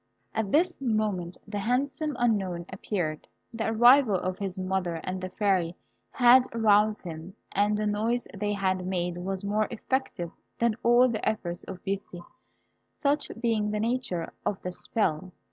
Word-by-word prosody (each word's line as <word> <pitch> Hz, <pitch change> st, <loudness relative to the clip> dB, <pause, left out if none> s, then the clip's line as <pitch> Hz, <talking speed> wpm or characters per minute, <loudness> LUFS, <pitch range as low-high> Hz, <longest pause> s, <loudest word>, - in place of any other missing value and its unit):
At 215 Hz, -3 st, -1 dB
this 335 Hz, -1 st, +2 dB
moment 215 Hz, -7 st, -1 dB
the 205 Hz, -1 st, -3 dB
handsome 275 Hz, +7 st, -1 dB
Unknown 195 Hz, -8 st, 0 dB
appeared. 175 Hz, -5 st, -3 dB, 0.3 s
The 225 Hz, -1 st, -1 dB
arrival 240 Hz, 0 st, +6 dB
of 185 Hz, 0 st, -2 dB
his 195 Hz, -1 st, -3 dB
mother 185 Hz, -2 st, -1 dB
and 185 Hz, 0 st, -4 dB
the 185 Hz, -, -4 dB
Fairy 185 Hz, -3 st, +1 dB, 0.3 s
had 250 Hz, +1 st, +6 dB
aroused 215 Hz, -1 st, +3 dB
him, 170 Hz, +2 st, -8 dB, 0.2 s
and 205 Hz, +1 st, +2 dB
the 215 Hz, -, -1 dB
noise 220 Hz, +4 st, 0 dB
they 205 Hz, +1 st, -1 dB
had 185 Hz, -2 st, 0 dB
made 175 Hz, -1 st, -1 dB
was 190 Hz, +1 st, -3 dB
more 210 Hz, +1 st, +1 dB
effective 235 Hz, -7 st, -2 dB, 0.3 s
than 235 Hz, -1 st, +2 dB
all 240 Hz, +2 st, +5 dB
the 235 Hz, -3 st, -3 dB
efforts 175 Hz, -5 st, -2 dB
of 185 Hz, -1 st, -8 dB
Beauty; 190 Hz, -3 st, -4 dB, 0.8 s
such 285 Hz, +1 st, +2 dB
being 225 Hz, -3 st, +1 dB
the 210 Hz, 0 st, -1 dB
nature 225 Hz, -7 st, -2 dB
of 200 Hz, -, -1 dB
the 180 Hz, -, -3 dB
spell. 180 Hz, -2 st, -1 dB
205 Hz, 155 wpm, -28 LUFS, 185-230 Hz, 0.8 s, arrival